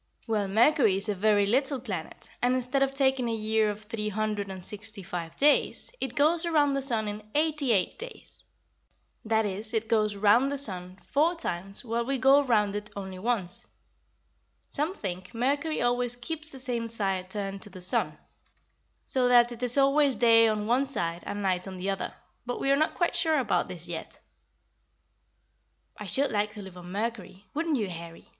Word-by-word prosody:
"Well, 215 -4 0
Mercury 225 +1 +4
is 200 +2 0
a - - +2
very 205 +1 +3
little 270 +6 +1
planet, 195 -10 -6
and 250 +1 +2
instead 255 +2 0
of 270 0 +3
taking 265 -3 +2
a 225 - -1
year 220 0 +1
of 210 +1 -5
three 210 0 -3
hundred 210 -1 -2
and 190 -1 -7
sixty 210 -1 -4
five 170 -2 -6
days, 290 +6 +2
it 260 -2 -3
goes 315 +3 +3
around 300 -4 +2
the 275 - 0
sun 230 -5 +1
in 210 +1 -4
eighty 300 -4 +2
eight 195 - +1
days. 480 +2 -5 0.8
That 220 0 +1
is, 210 +3 -3
it 225 0 -1
goes 215 -2 +1
round 215 +6 +4
the 285 - -2
sun 185 -8 +1
four 320 +5 +2
times 195 - -2
while 235 0 -1
we 270 +3 -1
go 270 +3 +6
round 210 -7 +1
it 210 0 -4
only 190 -2 -6
once. 200 -4 -2 1.0
Some 310 +7 -1
think 185 - -6
Mercury 285 +5 0
always 245 0 +1
keeps 310 +5 -5
the 270 - -9
same 245 -3 -2
side 195 -5 -2
turned 195 -1 -3
to 210 - -3
the 185 -1 -11
sun, 180 +1 +1 0.9
so 255 -2 +1
that 240 -1 +5
it 240 0 -8
is 245 +1 +1
always 275 0 +4
day 230 -1 +6
on 215 -1 0
one 245 +5 +2
side 170 -10 -2
and 205 0 -4
night 185 -1 0
on 190 -1 -7
the 190 +2 -1
other, 195 - -3 0.3
but 245 0 -4
we 275 - +1
are - - +6
not 310 +2 +1
quite 345 - 0
sure 320 -2 +2
about 260 -5 +1
this 175 -1 -7
yet." 170 -2 -7 1.8
"I - - -8
should 280 +1 0
like 210 0 0
to 210 -2 -8
live 190 -2 -11
on 180 0 -10
Mercury, 210 -2 -4
wouldn't 315 -1 0
you, 210 -4 -1
Harry?" 170 -2 -9
225 Hz, 190 wpm, -28 LUFS, 200-270 Hz, 1.8 s, go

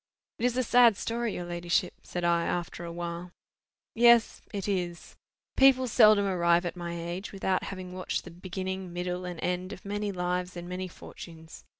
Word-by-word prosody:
"It 235 - 0
is 245 0 +1
a 255 - +2
sad 235 -3 +6
story, 230 -1 -2
your 175 - -4
ladyship," 175 +1 0
said 175 - -5
I, 170 0 +3
after 175 0 -3
a 170 - -5
while. 170 +1 -5 0.6
"Yes 235 0 +5
it 200 -2 -4
is. 175 -4 -3 0.4
People 265 -1 +5
seldom 215 -2 +6
arrive 175 -2 +3
at 175 - -3
my 170 -1 -5
age 175 +3 -5
without 190 -1 -1
having 185 -2 -7
watched 185 0 -3
the - - -10
beginning, 185 +1 -5
middle, 180 +1 -3
and 175 -2 -6
end 180 +1 -2
of 205 - -9
many 205 0 -2
lives 180 0 -2
and 175 0 -6
many 185 +1 -4
fortunes. 160 -2 -12
180 Hz, 180 wpm, -29 LUFS, 175-200 Hz, 0.6 s, sad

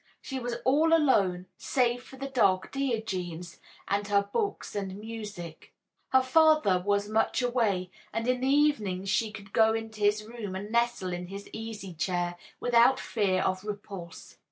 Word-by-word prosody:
She 265 -1 -5
was 245 -1 -3
all 310 +5 +4
alone, 195 - +2
save 245 -2 +1
for 260 - -13
the 275 +1 -4
dog 195 -8 +2
Diogenes 190 - -3 0.3
and 200 0 0
her 200 -1 +3
books 400 - -3
and 195 -2 -3
music. 210 -7 -8 0.3
Her 260 0 +4
father 305 - +4
was 205 +1 +1
much 220 +4 +1
away, 215 -7 0 0.2
and 230 +1 -2
in 250 0 +1
the 260 - +1
evenings 220 -10 +2
she 220 +2 +1
could 200 -2 -11
go 220 0 +4
into 225 -1 -6
his 210 +1 +2
room 220 -4 -6
and 205 +3 -6
nestle 235 -6 +1
in 175 0 -5
his 200 +2 -8
easy 215 -4 -6
chair 175 +1 -1 0.2
without 245 +2 +4
fear 195 -5 0
of 185 0 -1
repulse. 200 -5 -8
215 Hz, 160 wpm, -29 LUFS, 190-245 Hz, 0.3 s, all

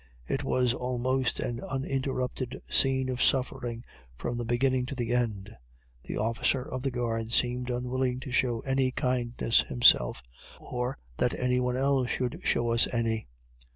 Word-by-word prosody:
It - - -1
was 125 -1 +2
almost 125 +1 -1
an 120 0 -2
uninterrupted 130 -1 -3
scene 130 -1 +3
of 125 -1 -2
suffering 125 -3 0 0.3
from 120 - -3
the - - -2
beginning 125 +2 +1
to 140 - -5
the 120 -2 -2
end. 110 -3 -1 0.5
The - - -4
officer 115 +4 +1
of 130 -1 -5
the 135 - 0
guard 115 -2 -2
seemed 125 +1 0
unwilling 125 +1 -1
to 135 - -7
show 120 -3 +1
any 135 -1 +1
kindness 125 -3 +1
himself, - - +4 0.4
or 125 +1 -3 0.2
that 125 - +1
any 125 0 +2
one 125 0 0
else 135 -1 +2
should 125 -1 -2
show 120 0 +1
us 115 0 +4
any. 115 - -1
125 Hz, 155 wpm, -29 LUFS, 120-130 Hz, 0.5 s, himself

